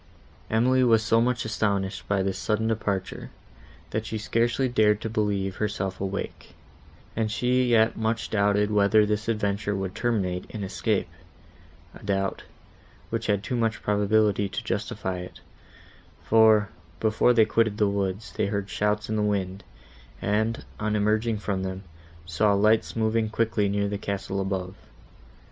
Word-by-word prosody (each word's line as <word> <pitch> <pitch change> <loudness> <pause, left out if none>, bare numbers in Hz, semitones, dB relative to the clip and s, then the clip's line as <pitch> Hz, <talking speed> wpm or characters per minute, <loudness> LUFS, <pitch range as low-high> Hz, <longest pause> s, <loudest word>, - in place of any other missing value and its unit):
Emily 130 +4 +3
was 115 -2 +4
so 115 +1 +3
much 125 0 0
astonished 100 -3 -1
by 100 -2 +1
this 95 -1 -2
sudden 110 0 0
departure, 100 -4 -2 0.6
that 110 - -1
she 110 0 -4
scarcely 115 +4 +1
dared 105 -4 +3
to 115 - -4
believe 100 -3 -1
herself 95 -3 -2
awake; 100 0 -5 0.6
and 110 -1 -1
she 125 +3 +2
yet 115 -2 +3
much 110 +1 -2
doubted 105 0 +2
whether 105 +1 +4
this 105 +1 -2
adventure 105 -2 -1
would 95 -1 -3
terminate 100 -6 -1
in 105 - -5
escape,—a 90 -5 -6
doubt, 95 -1 -1 0.7
which 115 0 -2
had 100 -2 +1
too 125 - -3
much 115 -1 -1
probability 105 -1 +2
to - - -4
justify 95 -1 -3
it; 90 - -9 0.8
for, 110 -2 +5 0.3
before 110 +2 +3
they 115 -2 +5
quitted 110 -1 +1
the 105 -2 +3
woods, 100 +1 -2
they - - 0
heard 100 -1 -3
shouts 105 0 0
in 110 - -2
the 105 - +1
wind, 100 -2 -1 0.6
and, 110 +3 -1
on 105 0 -1
emerging 110 +2 +1
from 100 -2 -2
them, 95 0 -4 0.4
saw 100 +5 +2
lights 110 +2 +2
moving 110 0 +1
quickly 110 -2 0
near 100 0 0
the 100 0 -3
castle 100 -1 -3
above. 95 -1 -3
105 Hz, 150 wpm, -26 LUFS, 100-110 Hz, 0.8 s, for